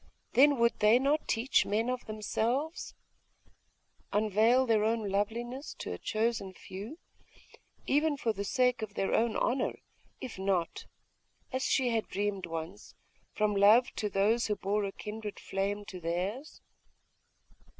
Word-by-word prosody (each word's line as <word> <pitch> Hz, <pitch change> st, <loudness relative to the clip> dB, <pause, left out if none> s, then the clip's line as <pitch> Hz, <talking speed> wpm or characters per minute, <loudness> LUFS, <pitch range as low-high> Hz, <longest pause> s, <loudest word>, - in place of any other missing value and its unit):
Then 280 Hz, +3 st, +6 dB
would 235 Hz, 0 st, +2 dB
they 210 Hz, +3 st, +6 dB
not 285 Hz, +4 st, +1 dB
teach 240 Hz, +4 st, +2 dB
men 215 Hz, +3 st, 0 dB
of 250 Hz, -1 st, -3 dB
themselves, 235 Hz, -, -2 dB, 1.2 s
unveil 220 Hz, +5 st, +3 dB
their 220 Hz, -3 st, +2 dB
own 220 Hz, -1 st, 0 dB
loveliness 235 Hz, +7 st, -3 dB
to -, -, -5 dB
a -, -, -7 dB
chosen 215 Hz, -3 st, -1 dB
few, 205 Hz, -, -8 dB, 0.9 s
even 295 Hz, +1 st, +2 dB
for 230 Hz, -4 st, 0 dB
the 200 Hz, -1 st, -4 dB
sake 250 Hz, +3 st, +1 dB
of 210 Hz, -2 st, -6 dB
their 195 Hz, -, -1 dB
own 230 Hz, -1 st, +2 dB
honour, 255 Hz, +1 st, 0 dB, 0.4 s
if 245 Hz, -7 st, -7 dB
not, 190 Hz, -3 st, -1 dB, 0.7 s
as 260 Hz, 0 st, -2 dB
she 260 Hz, -3 st, +2 dB
had 225 Hz, -2 st, -1 dB
dreamed 200 Hz, -2 st, -2 dB
once, 165 Hz, +5 st, -7 dB, 0.4 s
from 210 Hz, -1 st, 0 dB
love 210 Hz, +5 st, +6 dB
to 210 Hz, -, -1 dB
those 210 Hz, +4 st, +2 dB
who 210 Hz, -, 0 dB
bore 205 Hz, +1 st, -1 dB
a 195 Hz, -, -3 dB
kindred 210 Hz, +1 st, -7 dB
flame 200 Hz, +1 st, -2 dB
to 185 Hz, -2 st, -8 dB
theirs?.... 185 Hz, -, -4 dB
220 Hz, 140 wpm, -31 LUFS, 200-245 Hz, 1.2 s, Then